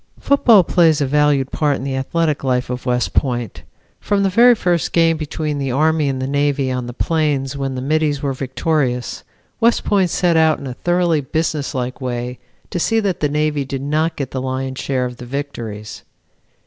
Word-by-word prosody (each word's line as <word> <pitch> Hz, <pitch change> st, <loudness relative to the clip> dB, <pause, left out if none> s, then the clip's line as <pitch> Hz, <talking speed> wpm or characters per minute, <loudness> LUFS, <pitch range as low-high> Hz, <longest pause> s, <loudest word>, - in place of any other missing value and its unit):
Football 235 Hz, -8 st, +5 dB
plays 165 Hz, -4 st, +3 dB
a 145 Hz, -, +1 dB
valued 145 Hz, -1 st, +2 dB
part 150 Hz, -2 st, +1 dB
in -, -, -6 dB
the 135 Hz, -1 st, -2 dB
athletic 150 Hz, +3 st, -1 dB
life 125 Hz, -1 st, 0 dB
of 125 Hz, +1 st, -5 dB
West 125 Hz, 0 st, 0 dB
Point. 120 Hz, -5 st, -1 dB, 0.4 s
From 200 Hz, -1 st, 0 dB
the 195 Hz, -, +1 dB
very 240 Hz, +4 st, +6 dB
first 175 Hz, -6 st, 0 dB
game 165 Hz, -1 st, +4 dB
between 155 Hz, -1 st, -3 dB
the 135 Hz, -2 st, -2 dB
Army 155 Hz, +2 st, +2 dB
and 135 Hz, -1 st, -2 dB
the 130 Hz, -, -2 dB
Navy 140 Hz, -1 st, 0 dB
on 125 Hz, -1 st, -3 dB
the -, -, -5 dB
plains 145 Hz, -1 st, -1 dB
when 135 Hz, -1 st, -3 dB
the 130 Hz, -, -4 dB
Middies 150 Hz, 0 st, +1 dB
were 140 Hz, -1 st, -2 dB
victorious, 130 Hz, -1 st, -2 dB, 0.4 s
West 235 Hz, 0 st, +3 dB
Point 195 Hz, -3 st, +2 dB
set 175 Hz, 0 st, +1 dB
out 160 Hz, -1 st, +4 dB
in -, -, -9 dB
a 130 Hz, -, -5 dB
thoroughly 175 Hz, +1 st, +1 dB
businesslike 140 Hz, -4 st, -2 dB
way 125 Hz, 0 st, -4 dB, 0.3 s
to 175 Hz, -, -2 dB
see 225 Hz, +6 st, +2 dB
that 200 Hz, -4 st, -1 dB
the 150 Hz, -, +1 dB
Navy 150 Hz, -1 st, 0 dB
did 135 Hz, 0 st, -5 dB
not 155 Hz, +3 st, 0 dB
get 135 Hz, -3 st, -4 dB
the 130 Hz, -, -3 dB
lion's 130 Hz, 0 st, -3 dB
share 130 Hz, -2 st, -1 dB
of 125 Hz, -1 st, -7 dB
victories. 120 Hz, -5 st, -6 dB
145 Hz, 190 wpm, -19 LUFS, 130-160 Hz, 0.4 s, very